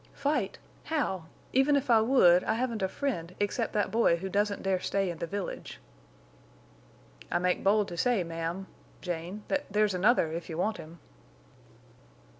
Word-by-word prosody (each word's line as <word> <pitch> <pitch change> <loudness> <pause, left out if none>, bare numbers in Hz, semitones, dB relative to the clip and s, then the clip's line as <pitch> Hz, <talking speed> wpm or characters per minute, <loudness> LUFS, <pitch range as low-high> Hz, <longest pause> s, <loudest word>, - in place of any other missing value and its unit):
"Fight! 285 +2 -1 0.3
How? 220 - -1 0.3
Even 270 +3 +4
if 280 -2 +1
I 225 -1 +6
would, 185 -8 +5
I 220 - +1
haven't 235 -2 -2
a 190 - +2
friend 185 - -3
except 205 +3 -1
that 210 -1 0
boy 225 -6 +4
who 190 +3 -5
doesn't 205 +1 0
dare 190 -1 +1
stay 195 0 -1
in 165 - -9
the 170 - -3
village." 200 +3 -5 1.5
"I - - +2
make 180 +1 0
bold 205 +1 +3
to 175 - -7
say, 235 0 +2
ma'am—Jane—that 175 - -5
there's 210 0 +2
another, 180 -3 +3
if 170 +1 -5
you 160 - -5
want 215 +5 0
him." 160 +2 -11
195 Hz, 155 wpm, -29 LUFS, 175-230 Hz, 1.5 s, I